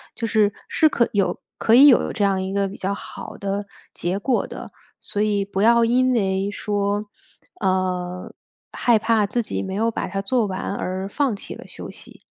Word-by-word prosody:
就 230 - -3
是 210 -2 +3
是 315 - +3
可 235 -5 +1
有 200 -2 +1 0.2
可 225 - +2
以 275 +4 +9
有 260 - +5
这 215 - -1
样 190 -1 +1
一 190 +1 -4
个 200 0 +1
比 195 - -9
较 195 +1 -2
好 - - -8
的 200 +1 -3 0.3
结 180 +3 -2
果 250 +3 +1
的。 - - -9 0.3
所 205 - -1
以 205 -2 +1
不 195 -1 -3
要 235 +2 +5
因 255 +2 +3
为 195 -3 0
说， 205 0 -1 0.6
呃， 185 -1 -1 0.4
害 235 -3 +3
怕 220 -1 +2
自 240 +4 0
己 - - -3
没 190 - -5
有 225 +3 +1
把 - - -3
它 195 +1 -3
做 235 +3 +1
完 190 +1 -3
而 185 0 -3
放 275 +2 0
弃 200 - -8
了 - - -11
休 - - -9
息。 - - -13
205 Hz, 210 characters per minute, -22 LUFS, 195-230 Hz, 0.6 s, 以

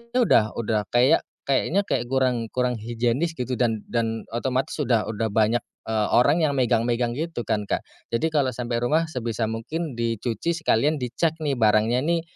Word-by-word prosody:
udah 215 - +3
udah 105 -3 -1
kayak, 125 +6 +4 0.2
kayaknya 155 +8 +1
kayak 125 -11 -1
kurang, 125 -3 +1
kurang 125 -2 0
higienis 120 +8 -1
gitu 125 -2 -3
dan 115 -4 +1
dan 115 -1 -1
otomatis 125 +3 -1
udah 120 -6 +2
udah 110 +1 -1
banyak 110 +2 +3 0.3
eee, 110 -2 +1
orang 145 +7 +4
yang 145 - 0
megang-megang 120 -1 +1
gitu 160 -4 -3
kan, 105 -2 -1
Kak. - - -1 0.3
Jadi 155 +8 +1
kalo 140 -4 +1
sampe 120 -1 -2
rumah, 155 +7 +1
sebisa 115 -4 -2
mungkin 135 +5 -4
dicuci 115 +5 -1
sekalian 155 -2 +2
dicek 150 +6 0
nih 140 -3 0
barangnya 110 +2 +3
nih 170 0 +1
120 Hz, 165 wpm, -24 LUFS, 115-140 Hz, 0.3 s, kayak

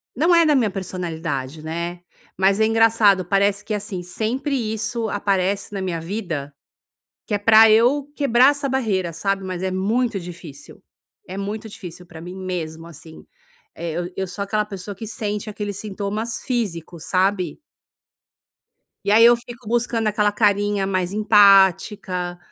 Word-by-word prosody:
não 335 +6 +3
é 335 -1 +5
da 300 - +4
minha 235 -5 +2
personalidade, 165 -6 -5
né. 170 +2 -4 0.4
Mas 195 +2 +3
é 220 - +4
engraçado, 225 -4 +4
parece 200 +2 +1
que 215 - -3
assim, 200 -3 -4
sempre 245 - -2 0.2
isso 225 0 -3
aparece 200 0 -1
na 195 - -3
minha 175 -3 -2
vida, 165 -6 -5 0.7
que 210 - -2
é - - +1
pra 220 +1 +7
eu 265 +6 +3
quebrar 260 -1 +5
essa 285 -1 -3
barreira, 200 -10 -1
sabe. 195 +3 -2
Mas 185 -1 -5
é 190 - -1
muito 215 +4 0
difícil, 170 -5 -11 0.5
é 190 - -6
muito 210 +3 -5
difícil 180 -3 -10
pra 165 -1 -12
mim 180 +2 -8
mesmo, 165 -3 -5
assim. 160 0 -13 0.5
Eh, 165 -1 -4 0.2
eu 190 - -2
sou 180 +3 -6
aquela 210 +1 0
pessoa 200 0 -7
que 220 +3 -8
sente 210 -2 -4
aqueles 205 -1 -5
sintomas 210 +2 -4
físicos, 175 - -3
sabe. 190 - 0 1.4
E 205 - +2
aí 225 +2 +7
eu 240 0 +7
fico 240 -1 -11
buscando 235 -2 0
aquela 210 0 +1
carinha 205 -2 +1
mais 185 -1 -1
empática, 195 -3 +3
200 Hz, 150 wpm, -21 LUFS, 180-220 Hz, 1.4 s, pra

